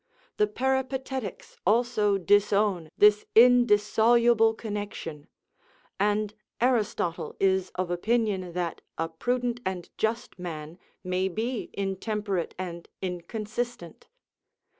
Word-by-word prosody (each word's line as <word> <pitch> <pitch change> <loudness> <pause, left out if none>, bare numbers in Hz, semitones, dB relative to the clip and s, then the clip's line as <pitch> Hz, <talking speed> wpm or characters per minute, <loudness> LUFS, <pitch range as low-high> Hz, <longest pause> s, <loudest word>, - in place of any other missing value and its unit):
The 210 - +3
Peripatetics 265 -1 -2
also 215 -1 +2
disown 200 -2 +2
this 210 0 +6
indissoluble 230 -1 +5
connection; 205 -9 -6 0.7
and 210 +1 +1 0.3
Aristotle 215 -8 0
is 190 -1 +2
of 185 -1 -2
opinion 195 -2 0
that 175 -2 -3 0.2
a 165 - -1
prudent 245 +8 -1
and 185 -2 -4
just 230 -2 -2
man 165 -1 -7 0.2
may 185 +1 0
be 220 +5 -3
intemperate 195 -1 -2
and 175 -2 -6
inconsistent. 210 +2 -5
210 Hz, 95 wpm, -27 LUFS, 180-235 Hz, 0.7 s, this